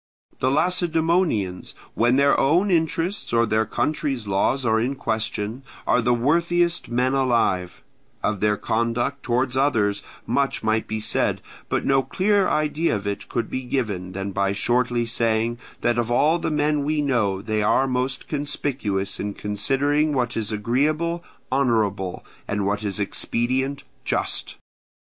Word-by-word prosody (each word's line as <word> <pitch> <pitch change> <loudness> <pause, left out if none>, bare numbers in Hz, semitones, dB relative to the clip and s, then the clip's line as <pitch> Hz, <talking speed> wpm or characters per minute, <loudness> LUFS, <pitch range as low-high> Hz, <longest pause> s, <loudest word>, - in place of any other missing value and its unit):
The 130 - +2
Lacedaemonians, 165 - +1 0.2
when 120 +2 +3
their 140 +1 +4
own 175 +8 +3
interests 170 +3 0
or 115 0 +4
their 110 0 +1
country's 140 -6 -1
laws 110 +7 +1
are 110 -1 +3
in 125 +5 -1
question, 110 -1 -3 0.2
are 125 - +3
the 120 +2 +2
worthiest 170 +7 +1
men 125 +2 +1
alive; 115 -9 +1 0.4
of 105 -2 0
their 105 0 +2
conduct 115 +6 -1
towards 125 +1 0
others 110 -7 +2 0.2
much 135 +2 0
might 110 0 +1
be 110 0 -3
said, 105 - +1 0.3
but - - 0
no 135 -1 +4
clearer 200 +6 +1
idea 155 0 +1
of 100 0 -5
it 100 0 -4
could 115 -2 -1
be 130 - -3
given 105 -8 -3
than 95 +1 -4
by 100 0 0
shortly 120 +2 +1
saying 115 0 0 0.2
that 120 0 +1
of 120 -1 -1
all 150 +7 +3
the - - -1
men 150 -1 +1
we 150 +1 0
know 110 -9 +1
they 110 +1 -1
are 120 +5 +3
most 130 0 -2
conspicuous 135 -9 -2
in 100 0 -3
considering 140 +9 +1
what 125 -3 0
is 110 -1 -2
agreeable 150 +10 0 0.3
honourable, 110 -8 0 0.2
and 105 -1 -1
what 105 +1 -1
is 100 -1 -2
expedient 130 +7 -1 0.2
just. - - -2
120 Hz, 150 wpm, -23 LUFS, 110-145 Hz, 0.4 s, their